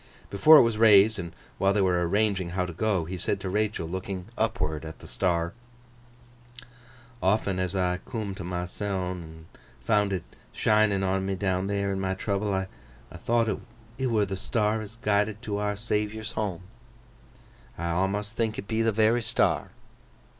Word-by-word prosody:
Before 155 +11 +8
it - - +8
was 115 -2 0
raised, 105 -1 +6
and 85 -2 -5 0.3
while 95 0 +3
they 105 - +2
were 90 -2 +2
arranging 100 -3 +1
how 90 +1 -1
to 90 - -6
go, 95 -1 0
he 90 +3 -5
said 100 - -1
to 95 - -3
Rachael, 105 -4 -1
looking 95 +1 -5
upward 80 -11 -1
at 80 0 -8
the - - -13
star: 85 -2 0 1.7
'Often 95 -1 +1
as 90 +1 -1
I 90 -1 +1
coom 110 -3 -5
to 95 - -7
myseln, 90 +1 -3
and 80 -1 -12 0.4
found 105 -2 +2
it 95 -3 -2 0.3
shinin' 105 -2 +3
on 95 0 0
me 95 0 -1
down 95 -1 -1
there 100 -1 -1
in 95 - -2
my 95 0 -1
trouble, 100 +1 -1
I 95 -1 -1 0.5
thowt 115 +5 0 0.4
it 130 - +1
were 110 -4 +2
the 95 -1 -4
star 110 +2 0
as 110 +1 -9
guided 105 -1 0
to 105 -2 -2
Our 105 0 -1
Saviour's 105 +1 -2
home. 100 -7 -3 1.2
I 85 - -4
awmust 100 +4 0
think 115 -2 -1
it 100 - -6
be 110 0 0
the 115 0 +3
very 110 +3 +3
star! 110 - +1
100 Hz, 170 wpm, -27 LUFS, 95-110 Hz, 1.7 s, Before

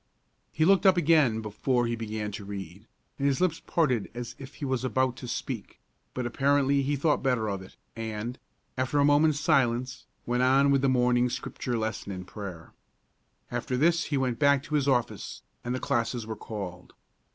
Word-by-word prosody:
He 155 - +1
looked 195 +1 +5
up 185 -1 +6
again 150 -9 +4
before 120 +4 0
he 115 0 -1
began 110 -2 -4
to 105 - -7
read, 100 -1 -8 0.3
and 140 - +2
his 135 -2 +1
lips 180 -3 +1
parted 130 - +1
as 120 -1 -6
if 135 +1 -10
he 145 - -5
was 130 -2 -1
about 130 -1 +1
to 125 - -7
speak; 120 - -5 0.4
but 125 - -2
apparently 140 +2 +2
he 140 +2 0
thought 145 +2 +1
better 125 -5 +1
of 100 -2 -3
it, 95 - -13 0.2
and, 115 +2 -4 0.4
after 130 +3 0
a 140 - +5
moment's 145 +1 +4
silence, 130 -5 +1 0.2
went 125 +1 0
on 135 +2 +4
with 135 -1 +3
the 135 - +3
morning 125 -1 +3
Scripture 120 0 -3
lesson 110 -2 -3
and 90 -1 -6
prayer. 95 -5 -8 0.8
After 120 +1 -2
this 165 +4 +3
he 145 - -1
went 125 -3 -1
back 140 -2 +4
to 155 - -8
his 145 -2 +2
office, 125 -4 -1 0.2
and 120 +1 -2
the - - -2
classes 120 -4 -1
were 110 0 -5
called. 95 -5 -7
125 Hz, 185 wpm, -28 LUFS, 110-140 Hz, 0.8 s, up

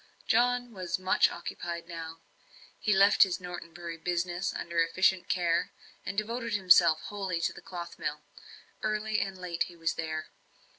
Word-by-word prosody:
John 245 0 +2
was 185 -4 -3
much 185 0 +3
occupied 170 0 -6
now. 165 -1 -7 0.6
He 210 - 0
left 200 +1 +5
his 190 -2 +5
Norton 175 -2 -7
Bury 170 0 -7
business 175 +2 -1
under 170 0 -3
efficient 180 +2 +2
care, 170 -2 +1 0.3
and 200 - -4
devoted 230 +2 -2
himself 180 -4 +6
almost - - -9
wholly 190 -4 -2
to - - 0
the - - -11
cloth 175 -2 -8
mill. - - -3 0.6
Early 215 0 0
and 195 -1 -3
late 180 -2 -2
he 175 - -13
was 165 -1 -1
there. 155 -1 -4
180 Hz, 160 wpm, -30 LUFS, 170-195 Hz, 0.6 s, himself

